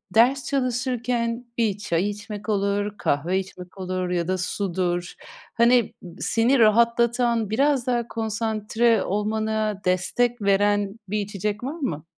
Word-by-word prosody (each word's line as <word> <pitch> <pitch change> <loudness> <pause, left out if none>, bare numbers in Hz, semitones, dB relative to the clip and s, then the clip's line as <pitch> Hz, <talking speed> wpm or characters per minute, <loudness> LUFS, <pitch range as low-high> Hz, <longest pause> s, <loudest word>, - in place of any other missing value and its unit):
ders 255 +4 +4
çalışırken 245 -2 -1
bir 220 -4 +1
çay 200 -2 0
içmek 210 +1 -7
olur, 205 0 0
kahve 170 +7 0
içmek 185 -1 -9
olur 185 -1 -3
ya 175 -2 -1
da 185 0 0
sudur. 180 -1 -2 0.4
Hani 235 -1 +3 0.3
seni 240 +4 +2
rahatlatan 235 0 +3
biraz 270 +2 +1
daha 240 -2 0
konsantre 220 0 0
olmana 215 0 -1
destek 225 +6 +1
veren 205 +1 +1
bir 210 +3 -1
içecek 205 +1 -3
var 270 +4 -3
mı? 165 - -3
215 Hz, 125 wpm, -24 LUFS, 195-235 Hz, 0.4 s, ders